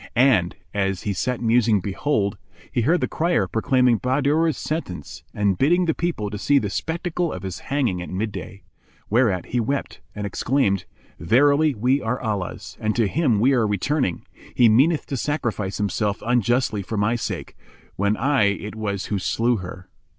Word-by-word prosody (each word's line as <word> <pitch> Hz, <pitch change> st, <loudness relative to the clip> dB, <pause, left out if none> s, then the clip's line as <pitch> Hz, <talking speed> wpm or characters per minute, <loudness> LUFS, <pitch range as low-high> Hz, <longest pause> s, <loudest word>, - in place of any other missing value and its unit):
And, 120 Hz, -9 st, +3 dB, 0.2 s
as 95 Hz, -2 st, -1 dB
he 100 Hz, -, -1 dB
sat 125 Hz, +6 st, -2 dB
musing 115 Hz, -2 st, +3 dB
behold, 100 Hz, +2 st, -1 dB, 0.4 s
he 120 Hz, -, 0 dB
heard 165 Hz, +10 st, +2 dB
the -, -, +1 dB
crier 165 Hz, -, +1 dB
proclaiming 125 Hz, +2 st, +2 dB
Bahadur's 145 Hz, +5 st, +1 dB
sentence 90 Hz, -, -5 dB
and 100 Hz, -3 st, 0 dB
bidding 175 Hz, +6 st, +3 dB
the 160 Hz, -, +1 dB
people 155 Hz, -13 st, -2 dB
to 105 Hz, -, -5 dB
see 145 Hz, +6 st, +3 dB
the 105 Hz, -7 st, 0 dB
spectacle 170 Hz, -, -2 dB
of -, -, -6 dB
his 95 Hz, -2 st, -5 dB
hanging 125 Hz, -11 st, -1 dB
at 90 Hz, -, -7 dB
midday; 100 Hz, -1 st, -5 dB, 0.5 s
whereat 110 Hz, -6 st, +2 dB
he 125 Hz, -, 0 dB
wept 135 Hz, +5 st, -2 dB
and 105 Hz, -1 st, -4 dB
exclaimed, 100 Hz, -3 st, 0 dB, 0.3 s
"Verily, 145 Hz, +4 st, +3 dB
we 125 Hz, +6 st, +1 dB
are 120 Hz, +2 st, -2 dB
Allah's 105 Hz, -6 st, -4 dB
and 110 Hz, -1 st, -1 dB
to 115 Hz, -3 st, +2 dB
Him 130 Hz, -, +1 dB
we 130 Hz, +5 st, +4 dB
are 120 Hz, -4 st, +2 dB
returning! 105 Hz, -, -1 dB, 0.3 s
He 120 Hz, -, +6 dB
meaneth 140 Hz, +9 st, +3 dB
to 140 Hz, -, -4 dB
sacrifice 120 Hz, -9 st, -2 dB
himself 105 Hz, 0 st, -1 dB
unjustly 120 Hz, -2 st, +1 dB
for 105 Hz, +3 st, -5 dB
my 105 Hz, +3 st, +2 dB
sake, 115 Hz, -, -5 dB, 0.4 s
when 100 Hz, +2 st, +1 dB
I 135 Hz, -3 st, +2 dB
it 100 Hz, +1 st, -2 dB
was 100 Hz, -3 st, -3 dB
who 100 Hz, -, -2 dB
slew 115 Hz, +5 st, +1 dB
her. 95 Hz, 0 st, -8 dB
115 Hz, 170 wpm, -23 LUFS, 100-140 Hz, 0.5 s, He